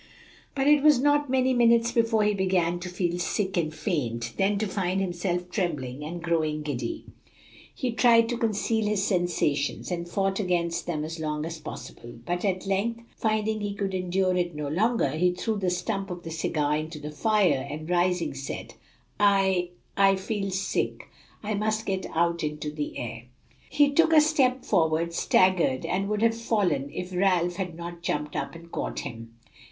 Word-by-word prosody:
But 270 -1 +1
it 295 -1 +6
was 300 -3 +6
not 290 +1 +2
many 260 0 +2
minutes 235 -1 +4
before 230 -2 +2
he 210 0 +2
began 185 -3 +1
to 180 +1 -6
feel 175 -1 -1
sick 190 +1 -1
and 160 -3 0
faint, 120 - -2
then 200 +1 +1
to 215 - 0
find 190 -2 -1
himself 180 -1 -2
trembling 150 - -2
and 170 +3 -6
growing 155 -3 0
giddy. 125 -6 -4 0.7
He 255 -3 -1
tried 230 -1 +5
to 240 - -1
conceal 220 -1 0
his 210 -2 +1
sensations, 175 -6 0
and 170 -1 -3
fought 195 +2 0
against 175 -3 -1
them 155 -3 -2
as 160 +2 -5
long 150 -1 -2
as 165 -1 -6
possible. 120 -5 -9
But 175 0 -2
at 185 -2 -1
length, 210 +4 -1
finding 215 -1 0
he 205 -1 -3
could 195 -1 -2
endure 185 0 +1
it 175 -2 -1
no 150 -1 -3
longer, 210 - +1
he 175 +4 +2
threw 215 +4 -2
the 185 -2 0
stump 195 +3 -2
of 175 -1 -6
the 165 - -6
cigar 150 -2 0
into 155 +1 -5
the 150 0 -7
fire, 185 -5 +2
and 155 +2 -6
rising, 180 0 +1
said, 135 0 -6 0.5
"I 195 -3 +3 0.3
I 195 0 +5
feel 195 +1 -3
sick. 190 0 -2 0.3
I 215 +1 -2
must 215 +1 -1
get 190 -1 -2
out 170 0 +1
into 150 0 -3
the 150 -1 -4
air." 115 0 -6 0.4
He 290 -1 +4
took 325 +2 +4
a 310 - +8
step 265 -4 +2
forward, 165 -2 +1
staggered, 175 -7 +3
and 195 +2 -1
would 210 +1 0
have 230 0 +3
fallen, 205 -11 0
if 180 +3 -6
Ralph 180 -2 +2
had 180 -4 -3
not 170 0 -7
jumped 150 -3 -2
up 140 +3 -3
and 170 0 -12
caught - - -3
him. 115 -3 -8
180 Hz, 180 wpm, -27 LUFS, 160-210 Hz, 0.7 s, a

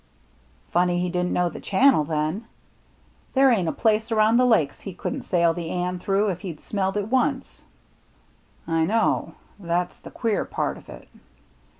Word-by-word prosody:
" 60 0 -34
Funny 175 0 +2
he 180 0 -1
didn't 180 0 -1
know 180 0 +1
the 170 - -7
channel 255 - +3
then. 155 +7 -2 0.9
There 265 0 +6
ain't 190 -8 +1
a - - +1
place 220 0 +1
around 220 +1 +4
the 250 0 +4
Lakes 160 - +2
he 195 -3 -8
couldn't 265 +8 -4
sail 170 -5 +2
the 165 -1 -5
Anne 180 +1 -2
through 200 +3 +1
if 180 -2 -3
he'd 175 -7 -7
smelled 195 -1 -2
it 205 0 -2
once." 260 +2 -1 0.5
" - - -36 0.2
I 165 -1 +1
know. 220 +6 0 0.2
That's 175 -1 -2
the - - -11
queer 225 -4 -1
part - - -3
of - - -19
it. - - -11
185 Hz, 180 wpm, -24 LUFS, 170-220 Hz, 0.9 s, There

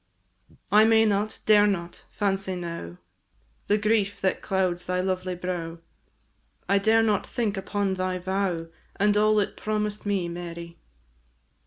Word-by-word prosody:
I 210 +1 +7
may 225 0 +5
not, 210 0 0
dare 210 -1 +6
not, 175 -4 -3
fancy 195 -2 -1
now 170 - -6 0.7
The 205 - +3
grief 205 -1 +1
that 190 -1 0
clouds 185 -2 -1
thy 180 0 0
lovely 185 0 -1
brow, 175 -2 -4 0.9
I 200 0 +3
dare 220 +2 +4
not 210 -3 +1
think 220 -4 -1
upon 195 0 -1
thy 185 0 -2
vow, 185 -2 -1 0.3
And 205 +1 +2
all 215 0 +4
it 200 - -1
promised 210 -1 -2
me, 195 -4 0
Mary. 170 -1 -7
195 Hz, 140 wpm, -26 LUFS, 180-210 Hz, 0.9 s, I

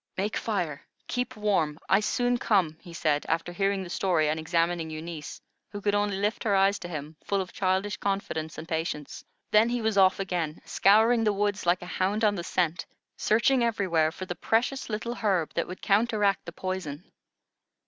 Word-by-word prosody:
"Make 205 +3 -1
fire. 175 -10 -2 0.3
Keep 250 0 -2
warm. 190 -8 +1
I 195 - +5
soon 245 +3 +1
come," 185 -10 +2
he 175 - -12
said, 155 -3 0
after 165 +2 0
hearing 195 +1 0
the 180 - -8
story 170 -7 +1
and 155 +1 -1
examining 165 0 0
Eunice, 155 -1 -7 0.3
who 205 - -6
could 205 0 0
only 205 -1 +1
lift 205 +3 -1
her 205 -3 +2
eyes 195 +1 +3
to - - -7
him, 155 -2 -7
full 200 - 0
of 185 -1 -4
childish 190 +1 0
confidence 195 -6 -3
and 160 - -7
patience. 160 -3 -3 0.3
Then 215 +2 +5
he 245 0 0
was 220 -3 +1
off 190 0 +5
again, 175 -5 -2
scouring 225 +4 +4
the 215 - +3
woods 205 -2 -1
like 175 +1 +2
a 180 - -7
hound 205 +4 +1
on 210 - +4
the 175 -4 -4
scent, 175 -1 -1 0.3
searching 240 +4 +3
everywhere 185 -9 +1
for 185 - -7
the 180 - -4
precious 240 +8 0
little 220 +2 -3
herb 195 -9 0
that - - -1
would 180 - -9
counteract 205 -1 +2
the - - -5
poison. 180 -4 -4
190 Hz, 190 wpm, -27 LUFS, 165-210 Hz, 0.3 s, I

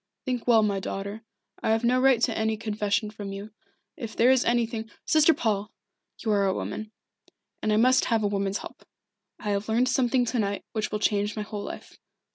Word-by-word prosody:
"Think 250 -2 -2
well, 225 -3 +6
my 200 -2 +1
daughter. 200 +3 -5 0.4
I - - 0
have 225 +1 +2
no 250 +2 +3
right 265 -3 +5
to 235 -2 +2
any 220 0 0
confession 210 -1 -1
from 205 -2 -7
you. 200 +2 -7 0.4
If 230 -4 -7
there 245 +3 +5
is 260 -1 +4
anything 230 -2 0
" - - -42
"Sister 310 +1 +5
Paul 210 -7 -1 0.5
you 220 - -2
are 200 -1 +3
a 190 - +1
woman, 215 0 -5 0.7
and 215 - 0
I 210 - +3
must 255 +3 +4
have 225 -2 +1
a - - +3
woman's 200 0 -1
help. - - -10 0.5
I 210 - -3
have 200 +2 -2
learned 240 +3 +2
something 255 -1 +2
to 240 +1 -1
night 200 -1 -1
which 215 -2 -2
will 210 - 0
change 210 -1 0
my 215 - -3
whole 210 0 -6
life. - - -9
220 Hz, 210 wpm, -26 LUFS, 205-240 Hz, 0.7 s, well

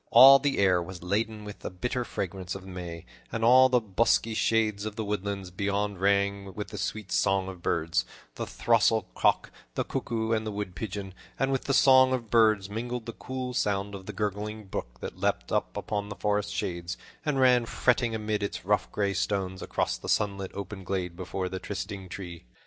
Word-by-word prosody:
All 135 +1 +10
the 140 0 0
air 95 -3 +4
was 85 0 -8
laden 105 +3 -1
with 105 0 -8
the - - -5
bitter 125 +7 -2
fragrance 95 -4 -4
of 95 - -7
the - - -12
May, 85 -2 -7 0.3
and 115 - -2
all 130 +2 +7
the 125 -1 +4
bosky 110 +1 +2
shades 110 -2 +1
of 110 -1 -4
the 110 -1 -3
woodlands 100 -2 -3
beyond 100 +1 -1
rang 100 0 +1
with 105 - -5
the 105 - -6
sweet 105 -3 -4
song 95 -1 +2
of 95 -2 -8
birds 80 -6 +1 0.3
the - - -5
throstle 115 -2 +3
cock, - - +2 0.2
the - - +1
cuckoo, 110 -1 -2
and 110 -1 +1
the 110 - -3
wood 100 -3 -4
pigeon 100 -1 -5 0.2
and 135 0 +1
with 135 - -1
the 135 - +1
song 130 -1 +6
of 115 -4 -3
birds 110 -4 +4
mingled 120 +3 -4
the 115 - -6
cool 130 +1 -5
sound 100 -3 0
of 95 -1 -8
the 105 - -5
gurgling 105 +1 -3
brook - - -6
that - - -6
leaped - - -1
out - - +1
of 105 -1 -3
the 100 - -6
forest 105 0 0
shades, 85 -2 -3 0.3
and 150 -4 0
ran 125 -2 +5
fretting 120 -2 +1
amid 105 -1 -1
its 100 -3 -4
rough, 105 +1 +1
gray 100 -1 0
stones 95 -1 -1
across - - -1
the - - -7
sunlit 100 -2 0
open 100 0 -6
glade 90 -2 -2
before 95 +1 -3
the 95 0 -4
trysting 95 0 -5
tree. 85 -3 -7
100 Hz, 200 wpm, -28 LUFS, 95-110 Hz, 0.3 s, All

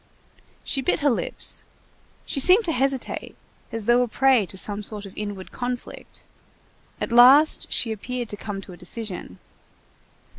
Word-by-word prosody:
She 270 - 0
bit 265 - 0
her 285 -1 +3
lips; 235 - -2 0.6
she - - -2
seemed 370 - +6
to 335 - +1
hesitate, 270 -2 -2 0.4
as 225 -2 -5
though 240 +2 +4
a 250 - +1
prey 255 -3 +3
to 190 - -7
some 205 +2 -3
sort 210 0 -7
of 195 - -12
inward 205 -3 -6
conflict. 245 0 -6 0.8
At - - -3
last 260 +6 +6
she 230 - +1
appeared 240 +3 -4
to - - -4
come 205 -1 -6
to 185 - -11
a - - -12
decision. 180 - -6
235 Hz, 155 wpm, -24 LUFS, 205-265 Hz, 0.8 s, seemed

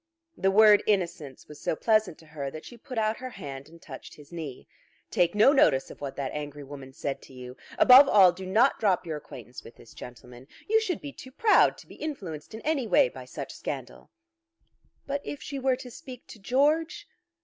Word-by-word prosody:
The 195 - +1
word 210 +1 +6
innocence 170 -9 -2
was 150 - -13
so - - -1
pleasant 215 -3 +1
to 165 - -18
her 150 -3 -6
that 155 +3 -10
she 240 - -11
put 235 +1 -10
out 220 0 0
her 255 0 -7
hand 140 - -9
and 165 +1 -16
touched 135 -5 -11
his 150 +1 -17
knee. 155 -7 -8 0.4
"Take 175 +2 +1
no 220 +7 +6
notice 140 - +3
of - - -14
what 140 -2 -5
that 135 -2 -4
angry 145 -1 -6
woman 135 -1 -10
said 135 +1 -5
to - - -16
you. 125 0 -10 0.2
Above 265 +2 +8
all, 190 -4 +7
do 185 +1 -9
not 225 +8 +3
drop 190 -4 +1
your 160 -2 -4
acquaintance 125 -4 -11
with 115 - -14
this 115 - -17
gentleman. 125 +1 -12 0.2
You 445 +1 +3
should 375 -6 -3
be 285 -2 -8
too 260 - -12
proud 430 - +4
to - - -15
be - - -14
influenced 200 - -7
in 220 - -8
any 290 -6 -1
way - - +4
by - - -11
such - - -8
scandal." - - -7 1.0
"But 280 0 -3
if 290 - -6
she 280 -2 -6
were 265 -1 +1
to 250 -1 -11
speak 250 +1 -11
to 220 - -12
George?" 310 - 0
190 Hz, 210 wpm, -27 LUFS, -, 1.0 s, Above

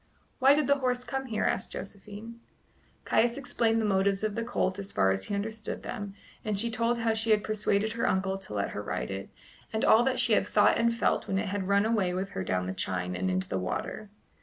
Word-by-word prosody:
"Why 270 +2 +6
did 300 -1 +2
the 280 +1 +3
horse 250 -1 0
come 265 +1 -4
here?" 220 -3 -1
asked - - -1
Josephine. 210 +4 -8 0.7
Caius 235 +2 +2
explained 230 -4 +1
the 220 - 0
motives 195 0 +2
of 215 -1 0
the 230 - -2
colt 200 -5 -1
as 200 0 -5
far 95 0 +3
as 95 0 -1
he 205 - -2
understood 215 +1 -4
them; 200 -1 -5 0.3
and 210 -2 -1
she 230 +3 +2
told 230 +1 +1
how 230 -1 +1
she 220 +1 -1
had 210 -2 +4
persuaded 215 0 0
her 230 - 0
uncle 190 0 0
to 190 - -8
let 100 - -1
her 105 - -4
ride 105 - -3
it, 95 0 -5 0.4
and 220 - 0
all 220 - +7
that 265 -1 +1
she - - +3
had - - +3
thought - - +4
and 230 0 +2
felt 230 - +1
when 190 - 0
it 200 +1 -1
had 195 -1 -2
run 200 +1 +3
away 205 -6 +1
with 190 +1 -3
her 95 - -3
down 90 -1 -1
the 95 - -3
chine 90 -1 -2
and 95 +1 -1
into 95 0 -1
the 95 - -2
water. 145 - -4
205 Hz, 235 wpm, -29 LUFS, 190-230 Hz, 0.7 s, all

